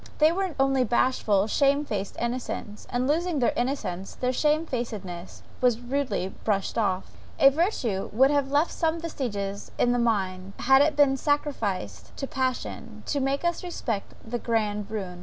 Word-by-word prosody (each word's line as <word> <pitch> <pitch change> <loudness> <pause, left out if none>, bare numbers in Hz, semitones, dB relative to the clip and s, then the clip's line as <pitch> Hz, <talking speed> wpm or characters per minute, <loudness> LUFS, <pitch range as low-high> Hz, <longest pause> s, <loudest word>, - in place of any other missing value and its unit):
No, - - -15
they 310 +1 +5
were 375 -1 -2
only 270 -1 +3
bashful, 220 -4 +2
shame 280 +6 +2
faced 200 -6 -4
innocents; 235 -3 -4
and 250 +1 0
losing 335 +2 +1
their 245 - +2
innocence, 210 -8 -2
their 250 0 -1
shame 305 +4 +2
facedness 205 - -5 0.2
was 245 -2 +3
rudely 250 -6 -2
brushed 200 -3 0
off; 195 -4 0 0.3
a 275 -3 +7
virtue 265 - 0
would 265 +6 +5
have 285 -2 +1
left 290 +4 +2
some 325 0 0
vestiges 205 -11 -4
in 245 - +3
the 245 - +2
mind, 195 -5 0
had 265 +2 +5
it 305 +1 +3
been 280 -2 +4
sacrificed 200 - -2
to - - -2
passion, 260 -2 -3
to 285 - -1
make 275 +4 0
us 345 +1 0
respect 235 - -3
the 240 +2 -3
grand 210 -3 -1
ruin. 190 -5 -5
245 Hz, 165 wpm, -26 LUFS, 205-285 Hz, 0.3 s, a